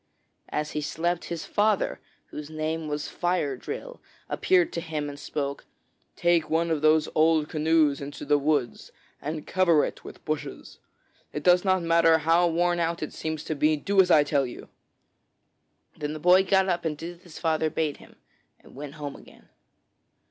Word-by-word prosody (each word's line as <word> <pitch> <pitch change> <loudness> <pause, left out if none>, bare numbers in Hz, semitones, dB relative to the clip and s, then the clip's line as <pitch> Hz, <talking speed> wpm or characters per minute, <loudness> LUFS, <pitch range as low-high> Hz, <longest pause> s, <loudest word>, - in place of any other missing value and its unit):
As 150 0 -2
he 150 - -2
slept, 170 +4 -2
his 170 -2 -5
father, 210 -1 +1 0.3
whose 150 0 -7
name 155 0 -3
was 150 0 -3
Fire 175 -6 -1
drill, - - -7 0.3
appeared 180 -2 +2
to 170 - -2
him 155 -3 -4
and 145 0 -9
spoke: 140 -1 -4 0.5
'Take 170 -2 +2
one 165 +1 +1
of 155 -2 0
those 155 0 +4
old 155 -1 +3
canoes 155 -2 +2
into 140 +1 -7
the 145 - +3
woods 145 -4 -1 0.3
and 150 +1 -5
cover 170 -5 +3
it - - -7
with - - -12
bushes. 145 -2 -5 0.5
It 150 - -4
does 180 0 +5
not 185 -2 +2
matter 165 -1 +4
how 165 +2 +3
worn 175 +1 +1
out 170 0 -1
it - - -5
seems 155 -1 -4
to - - -3
be; 155 +1 +2
do 195 +6 +3
as 180 - 0
I 155 -4 +6
tell 140 -2 +1
you.' 120 - -10 1.3
Then 150 0 -4
the 155 - -6
boy 180 +4 +5
got 190 0 +3
up 175 -2 0
and 155 -2 -2
did 170 +3 -7
as - - -27
his 170 - -12
father 160 -1 0
bade 155 -2 -2
him, - - -17 0.4
and - - -18
went 145 +2 -8
home 145 -2 -6
again. - - -17
160 Hz, 180 wpm, -26 LUFS, 150-170 Hz, 1.3 s, I